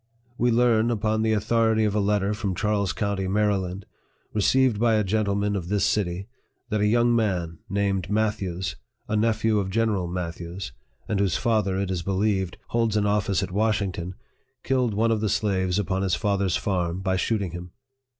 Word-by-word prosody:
We 120 0 +2
learn, 115 -1 +3
upon 110 -1 0
the 110 0 +2
authority 110 +1 +2
of 105 - 0
a 105 - +1
letter 100 0 +1
from 100 -3 -2
Charles 100 -2 0
county, 100 -1 -2
Maryland, 100 -2 0 0.5
received 120 +2 +3
by 115 -1 +3
a 105 - +2
gentleman 100 0 0
of 90 -4 -3
this 105 -1 +2
city, 95 -1 -1 0.4
that 105 -1 0
a 105 - +3
young 120 +2 +3
man, 90 -7 -1
named 100 -1 0
Matthews, 95 -6 -1 0.3
a 110 - -1
nephew 110 0 +2
of 95 -1 -2
General 105 -3 0
Matthews, 85 +1 -5 0.4
and 105 - -1
whose 100 -4 +1
father, 105 -5 +1
it 95 -1 -1
is 90 -2 -1
believed, 95 0 0
holds 115 -2 +1
an 105 - +2
office 100 -2 +1
at 95 - -4
Washington, 100 -4 -1 0.5
killed 125 -5 +1
one 115 +2 +2
of 110 -2 +1
the 110 - 0
slaves 95 -3 0
upon 95 -2 -1
his 95 -3 +1
father's 100 -4 0
farm 90 -2 -1
by 95 -1 0
shooting 100 -1 -1
him. 90 +1 -7
100 Hz, 175 wpm, -25 LUFS, 95-110 Hz, 0.5 s, learn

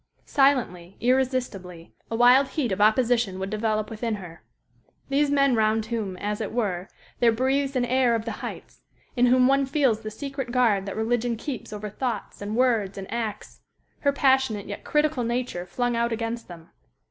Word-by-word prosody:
Silently, 230 -11 +1
irresistibly, 245 -9 -1 0.2
a 225 - -2
wild 250 +3 +6
heat 265 -5 -2
of 190 +2 -1
opposition 225 -2 +3
would 190 +1 -4
develop 215 0 -1
within 225 0 -2
her. 175 -4 -10 0.7
These 285 +1 +2
men 275 -2 +3
round 220 0 +2
whom, 220 -5 -3
as 210 +3 -3
it 215 - -3
were, 195 -6 -2 0.3
there 235 -1 +5
breathes 270 +4 0
an 250 -1 +2
air 250 -1 +2
of 225 -1 -3
the 230 - -3
heights; - - -8 0.3
in 245 0 +4
whom 250 +1 +5
one 275 +1 +3
feels 265 -6 +2
the 215 - -5
secret 270 +2 -5
guard 220 -6 +2
that 195 - -5
religion 235 +1 0
keeps 255 -1 -6
over 210 0 -5
thoughts 245 -1 -4
and 205 +1 -4
words 225 -6 +1
and 195 +2 -7
acts 225 -3 -5 0.4
her 280 - +2
passionate 265 -7 +2
yet 205 - -7
critical 300 -4 +1
nature 235 -7 -3
flung 245 +6 -1
out 235 0 0
against 230 +1 -3
them. 170 -2 -12
235 Hz, 175 wpm, -25 LUFS, 210-255 Hz, 0.7 s, wild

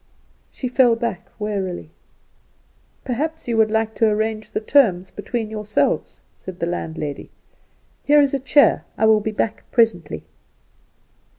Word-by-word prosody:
She 255 - -4
fell 245 -1 +4
back 230 -5 -4
wearily. 195 -6 -4 1.1
"Perhaps 305 +5 -3
you 235 - 0
would 220 -1 +4
like 220 0 0
to 225 - +4
arrange 215 0 -1
the - - -2
terms 215 -7 +2
between 220 +1 -4
yourselves," 210 -1 -1
said 185 -1 -9
the 170 - 0
landlady. 160 -4 -4 0.7
"Here 295 +1 +5
is 280 -1 +3
a 275 - +1
chair. 285 +2 +4
I 220 - +2
will 220 -1 +5
be 210 - -3
back 220 +1 -2
presently." 220 -10 +1
220 Hz, 135 wpm, -21 LUFS, 205-240 Hz, 1.1 s, Here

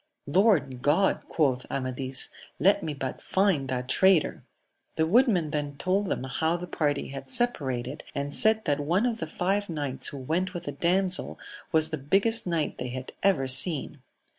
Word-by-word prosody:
Lord 145 - +2
God! 160 +8 +2
quoth 130 -5 0
Amadis: 130 0 -1 0.3
let 195 +3 +3
me 150 -2 -4
but 135 -1 -5
find 190 -9 +1
that 125 -1 -3
traitor 190 +3 +3
1 - - -22 0.3
— - - -46
The 160 - +2
woodmen 190 - +3
then 145 -2 -3
told 195 +5 0
them 130 - -2
how 160 +6 -1
the 175 - -6
party 145 -5 -2
had 135 0 -8
separated, 145 - -1
and 140 0 -4
said 220 0 +2
that 145 -3 0
one 175 +10 +1
of 235 -2 -1
the 160 - -4
five 195 +5 -1
knights 140 -5 -1
who 140 - -6
went 175 +8 -2
with 175 - -5
the 145 - -4
damsel 180 +5 0 0.3
was 160 -1 +2
the 155 - -3
biggest 195 +10 +1
knight 165 -3 -2
they 125 - -4
had 130 +1 -7
ever 185 -9 +2
seen. 135 +1 +4
155 Hz, 180 wpm, -27 LUFS, 135-190 Hz, 0.3 s, seen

